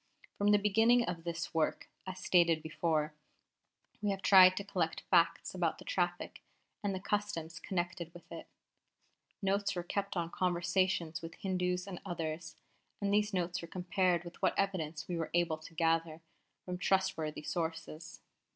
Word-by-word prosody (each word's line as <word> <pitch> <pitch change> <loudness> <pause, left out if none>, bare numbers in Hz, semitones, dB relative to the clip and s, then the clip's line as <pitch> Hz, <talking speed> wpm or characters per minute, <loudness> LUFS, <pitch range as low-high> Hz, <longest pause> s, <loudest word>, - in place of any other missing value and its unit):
From 205 - 0
the 205 0 +6
beginning 225 +4 +4
of 170 -2 -4
this 170 -1 -4
work, 160 -1 0 0.2
as 185 0 -5
stated 170 -3 +3
before, 160 -1 0 0.9
we 210 - 0
have 195 -1 -2
tried 185 -1 +8
to 200 - -2
collect 180 -5 -1
facts - - +3
about - - 0
the - - -13
traffic - - -2 0.4
and 200 -2 0
the - - -3
customs 185 -5 -2
connected 175 -1 -3
with 175 0 -15
it. - - -8 1.0
Notes 200 +1 +1
were 175 - -2
kept 200 +2 -2
of 170 -1 -2
conversations 175 -2 0
with 165 0 -8
Hindus 180 -1 -1
and 190 -3 -7
others, 160 -1 -4 0.4
and 200 0 0
these 210 0 +3
notes 175 -2 -1
were 170 - -7
compared 180 0 +1
with 175 0 -11
what - - +2
evidence 165 -5 -1
we 175 - -2
were 165 - -2
able 170 -2 +1
to 160 +1 -13
gather 165 0 +1 0.4
from 180 -1 -4
trustworthy 185 -6 0
sources. 165 0 -4
175 Hz, 160 wpm, -33 LUFS, 165-195 Hz, 1.0 s, tried